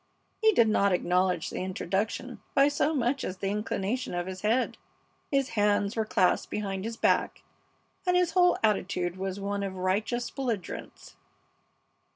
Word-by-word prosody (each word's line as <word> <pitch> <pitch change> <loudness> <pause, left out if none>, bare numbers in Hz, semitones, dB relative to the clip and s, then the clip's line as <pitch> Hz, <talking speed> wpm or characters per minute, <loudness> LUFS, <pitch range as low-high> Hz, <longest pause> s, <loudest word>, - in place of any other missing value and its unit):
He 440 0 +6
did 235 - +5
not 200 -2 +3
acknowledge 180 -1 +1
the - - -4
introduction 190 +2 -3
by 275 +1 +6
so 290 +1 +1
much 260 +1 0
as 185 - -4
the 195 +1 -2
inclination 210 +1 -2
of 175 0 -2
his 185 0 -6
head. 225 +5 +1 0.5
His 275 -1 +1
hands 205 -1 +1
were 220 -1 0
clasped 185 -3 +2
behind 195 -2 -3
his 225 0 -4
back, - - +1 0.6
and 360 0 +4
his 360 -2 +2
whole 360 -1 +4
attitude 185 -4 0
was 190 +1 -4
one 200 0 -2
of 195 -1 -3
righteous 205 +6 -1
belligerence. 235 - -5
205 Hz, 155 wpm, -28 LUFS, 190-240 Hz, 0.6 s, He